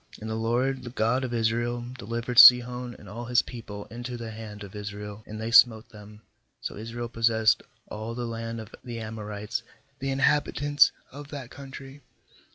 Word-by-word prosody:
^And 110 - -7
the 110 - -2
LOED, 125 +4 0
the 125 - -7
God 125 +2 +1
of 125 - -3
Israel, 120 +1 0
delivered 115 +2 0
Sihon 125 0 +8
and 105 - -14
all 115 +5 -7
his 120 0 +3
people 105 -4 -8
into 120 +1 -6
the 115 -1 -6
hand 105 -1 -8
of 100 - -10
Israel, 105 0 -7
and 110 0 -7
they 110 +1 -3
smote 115 -1 +6
them; 105 0 -13 0.4
so - - -5
Israel 115 +3 -5
possessed 115 -1 +3 0.3
all 110 +2 -6
the 120 0 -3
land 115 0 -5
of 110 0 -10
the 120 -2 -6
Amorites, 105 0 -5 0.4
the 135 - -2
in 135 - -1
habitants 145 0 +3 0.2
of 145 +1 -9
that 140 -4 -8
country. 135 0 -10
115 Hz, 175 wpm, -27 LUFS, 110-125 Hz, 0.4 s, Sihon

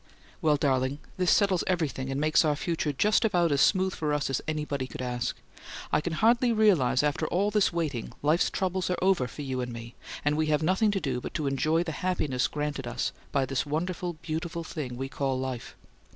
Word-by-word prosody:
Well, 155 -3 +4
darling, 135 -1 +1 0.2
this 180 -1 +2
settles 195 -4 +3
everything 155 -7 -1
and 135 +1 -2
makes 155 +1 +4
our 150 -2 +2
future 160 0 -1
just 205 - +2
about 175 -7 +2
as 140 -1 +3
smooth 190 -1 +3
for 150 -2 -1
us 145 -2 -1
as 135 - 0
anybody 150 -4 -2
could - - -9
ask. 125 -1 -2 0.5
I - - +3
can 170 +1 -3
hardly 235 +6 +3
realize 165 - +3
after 150 +1 0
all 200 +5 +1
this 210 -1 +3
waiting 155 -9 -2
life's 155 +4 +3
troubles 185 -1 -1
are 180 - 0
over 185 -8 +2
for 145 - -8
you 130 -2 -2
and 125 0 -4
me 115 0 -8 0.3
and 145 0 +3
we 155 0 +1
have 150 0 +2
nothing 190 +6 +3
to 200 -1 0
do 130 -7 -2
but - - -7
to 155 - -1
enjoy 155 +5 +1
the 170 - -4
happiness 150 -9 0
granted 150 -3 -3
us 120 +1 -2 0.2
by 135 -1 +2
this 135 -1 -1
wonderful, 175 +3 -2
beautiful 170 +1 -3
thing 135 -7 -5
we 135 +1 -3
call 135 -1 -1
life. 130 -2 -5
150 Hz, 210 wpm, -28 LUFS, 135-180 Hz, 0.5 s, Well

